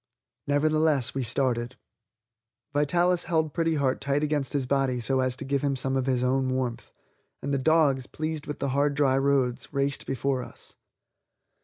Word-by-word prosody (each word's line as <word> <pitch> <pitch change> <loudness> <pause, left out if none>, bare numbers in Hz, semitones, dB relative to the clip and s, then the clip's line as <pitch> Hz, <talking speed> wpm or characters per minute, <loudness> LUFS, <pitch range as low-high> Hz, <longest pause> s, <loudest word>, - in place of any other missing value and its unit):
Nevertheless, 150 -2 +2
we 135 - -2
started. 120 0 -1 1.0
Vitalis 175 +5 +2
held 160 -3 0
Pretty 165 +1 +1
Heart 135 -3 0
tight 140 +2 0
against 145 -3 -1
his 140 -3 0
body 135 -2 +1
so 130 +3 0
as 130 -1 +1
to 140 - -7
give 140 0 0
him 140 -1 0
some 135 +1 0
of 130 0 0
his 125 -2 +1
own 130 +1 +1
warmth, 125 -2 -3 0.5
and 140 +1 -2
the 140 - +1
dogs, 140 -3 +3
pleased 155 -1 -4
with 150 - -4
the 140 - -2
hard 140 +2 +1
dry 140 -2 +3
roads, 135 -3 0
raced 140 -1 -1
before 135 0 -1
us. - - -10
140 Hz, 170 wpm, -27 LUFS, 130-145 Hz, 1.0 s, dogs